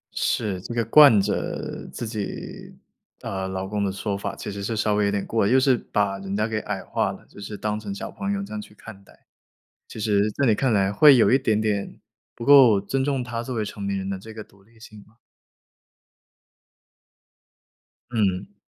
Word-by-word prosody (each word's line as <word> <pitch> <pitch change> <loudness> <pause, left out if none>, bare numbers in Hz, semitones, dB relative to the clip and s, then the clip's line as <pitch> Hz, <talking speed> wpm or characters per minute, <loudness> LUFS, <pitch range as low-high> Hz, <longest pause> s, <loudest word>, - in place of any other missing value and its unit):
是， 100 -5 -1
这 120 - -7
个 115 -1 0
惯 135 -2 +7
着 - - -4
自 - - -6
己， 110 -3 -7 0.5
呃， 95 -1 -4
老 95 0 -4
公 105 +1 -2
的 100 - 0
说 100 +1 -3
法 100 - -5
其 - - -6
实 100 0 -6
是 110 +2 -3
稍 105 0 +1
微 105 0 +2
有 100 - +1
点 100 -1 -2
过 115 - 0
了， 100 - +1
就 130 - +5
是 130 -1 +4
把 100 -4 -2
人 95 0 -5
家 105 - +1
给 110 -1 -2
矮 - - -5
化 - - -1
了， - - -12
就 - - -16
是 105 +1 -7
当 105 0 -2
成 105 -2 -6
小 100 - -7
朋 200 0 -4
友 200 -1 -2
这 200 - -9
样 105 - -4
去 105 - -15
看 100 -2 -12
待。 - - -23 0.6
其 - - -10
实 105 -1 +1
在 140 +6 -1
你 110 - +4
看 130 +3 0
来 100 -2 +2
会 140 +7 +7
有 120 - +4
一 130 - +5
点 110 -5 +1
点 105 -2 -2 0.4
不 115 - -7
够 130 -7 +7
尊 130 +7 -2
重 135 -3 -1
他 115 -1 -4
作 125 +1 -5
为 110 - -1
成 100 0 -7
年 100 0 -1
人 95 0 -5
的 100 - -2
这 110 +4 -11
个 110 -1 -9
独 95 -1 -24
立 115 +3 -25
性 110 -2 -13
吧。 110 +2 -24 2.9
嗯。 100 -3 -1
105 Hz, 230 characters per minute, -24 LUFS, 100-115 Hz, 2.9 s, 惯